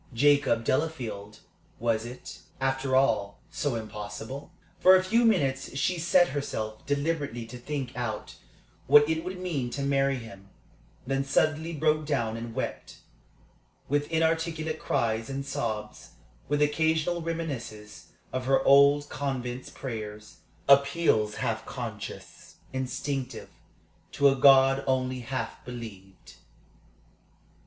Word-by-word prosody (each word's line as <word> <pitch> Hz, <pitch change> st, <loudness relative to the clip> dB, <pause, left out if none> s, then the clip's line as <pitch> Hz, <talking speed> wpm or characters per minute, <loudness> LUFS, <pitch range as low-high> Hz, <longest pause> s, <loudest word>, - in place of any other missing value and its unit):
Jacob 140 Hz, -3 st, +3 dB
Delafield? 115 Hz, -8 st, -2 dB, 0.4 s
Was 115 Hz, -1 st, 0 dB
it, 125 Hz, +1 st, -9 dB, 0.2 s
after 135 Hz, 0 st, 0 dB
all, 105 Hz, -7 st, +2 dB
so 145 Hz, -4 st, -1 dB
impossible? 110 Hz, +4 st, -7 dB, 0.3 s
For 185 Hz, +1 st, +8 dB
a 185 Hz, -, +3 dB
few 230 Hz, +6 st, +3 dB
minutes 135 Hz, -12 st, +1 dB
she 180 Hz, +4 st, 0 dB
set 175 Hz, +1 st, +4 dB
herself 110 Hz, -6 st, -4 dB
deliberately 145 Hz, -5 st, -1 dB
to 125 Hz, +2 st, -9 dB
think 135 Hz, -1 st, -4 dB
out 120 Hz, -3 st, -4 dB, 0.5 s
what 145 Hz, 0 st, +7 dB
it 160 Hz, 0 st, -1 dB
would 185 Hz, +1 st, -5 dB
mean 155 Hz, -9 st, -2 dB
to 140 Hz, +3 st, -4 dB
marry 140 Hz, 0 st, +2 dB
him; 100 Hz, -5 st, -10 dB, 0.6 s
then 135 Hz, +1 st, 0 dB
suddenly 155 Hz, +4 st, +1 dB
broke 155 Hz, -1 st, +1 dB
down 115 Hz, -7 st, 0 dB
and 115 Hz, 0 st, -6 dB
wept, -, -, -5 dB, 0.9 s
with 145 Hz, +1 st, 0 dB
inarticulate 160 Hz, -1 st, 0 dB
cries 115 Hz, 0 st, -1 dB
and 135 Hz, 0 st, -4 dB
sobs, 110 Hz, -6 st, -4 dB, 0.4 s
with 145 Hz, 0 st, +3 dB
occasional 160 Hz, +3 st, +1 dB
reminiscences 135 Hz, -11 st, -5 dB, 0.3 s
of 130 Hz, 0 st, -2 dB
her 135 Hz, 0 st, +3 dB
old 140 Hz, +1 st, +6 dB
convent's 130 Hz, -3 st, -4 dB
prayers, 105 Hz, -4 st, -7 dB, 0.3 s
appeals 140 Hz, -6 st, +4 dB
half -, -, -2 dB
conscious, -, -, -8 dB, 0.2 s
instinctive, 130 Hz, 0 st, -3 dB, 0.6 s
to 140 Hz, 0 st, +5 dB
a 135 Hz, -, +2 dB
God 135 Hz, 0 st, +6 dB
only 130 Hz, -1 st, 0 dB
half 120 Hz, -1 st, -5 dB
believed. 110 Hz, -6 st, -10 dB
135 Hz, 120 wpm, -28 LUFS, 115-150 Hz, 0.9 s, For